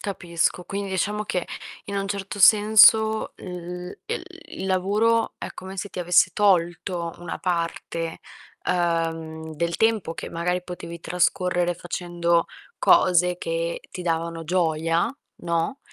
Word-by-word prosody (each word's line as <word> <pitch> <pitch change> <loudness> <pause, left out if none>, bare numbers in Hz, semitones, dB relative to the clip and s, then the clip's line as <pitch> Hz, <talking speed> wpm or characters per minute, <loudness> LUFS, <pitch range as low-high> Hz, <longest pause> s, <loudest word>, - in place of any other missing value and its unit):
Capisco. 175 -2 -1
Quindi 200 +1 -4
diciamo 210 +3 -1
che 180 -3 -2 0.4
in 200 0 -4
un 195 0 -2
certo 200 0 -4
senso 220 +1 +6
il 180 0 -7
ehm, - - -3 0.3
il 190 - -5
lavoro 210 +5 +2
è - - -6
come 190 +1 -8
se 205 - -4
ti - - -8
avesse 175 0 +4
tolto 175 -3 +1
una 175 - -6
parte, 170 -2 -3 0.5
uhm, 165 -2 -1
del 170 +2 -1
tempo 220 -7 +1
che 160 - -6
magari 180 +2 -1
potevi 170 -1 -8
trascorrere 175 0 +1
facendo 170 -1 0 0.3
cose 180 0 +4
che 165 0 -2
ti 180 - -6
davano 165 -1 -2
gioia, 165 -1 +1 0.3
no, 170 +10 -1
175 Hz, 130 wpm, -24 LUFS, 170-195 Hz, 0.5 s, senso